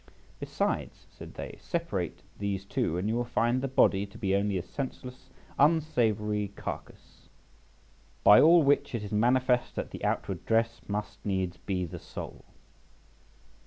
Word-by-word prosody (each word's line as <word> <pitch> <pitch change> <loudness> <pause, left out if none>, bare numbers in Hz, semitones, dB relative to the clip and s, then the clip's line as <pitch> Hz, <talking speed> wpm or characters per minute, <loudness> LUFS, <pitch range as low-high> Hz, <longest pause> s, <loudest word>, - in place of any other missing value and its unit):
Besides, - - -2
said - - -11
they, - - -7
separate 105 - -3 0.2
these 100 -1 -2
two, 85 -3 -1
and 95 +3 -1
you 110 - 0
will 120 +1 0
find 120 +1 +1
the 135 - -1
body 100 -6 +3
to 100 - -14
be 95 0 0
only 100 -1 +1
a 90 - -3
senseless 130 +4 -7 0.3
unsavoury 115 -9 +2
carcass. - - -8 0.9
By 105 - +9
all 165 +1 +7
which 140 -3 +2
it 110 - -3
is 105 - -7
manifest 125 +3 +2
that - - -4
the - - -8
outward - - -1
dress 115 +1 +1
must 105 0 -4
needs 95 -3 -1
be 95 -3 -2
the 85 - -8
soul. - - -9
105 Hz, 150 wpm, -29 LUFS, 100-130 Hz, 0.9 s, By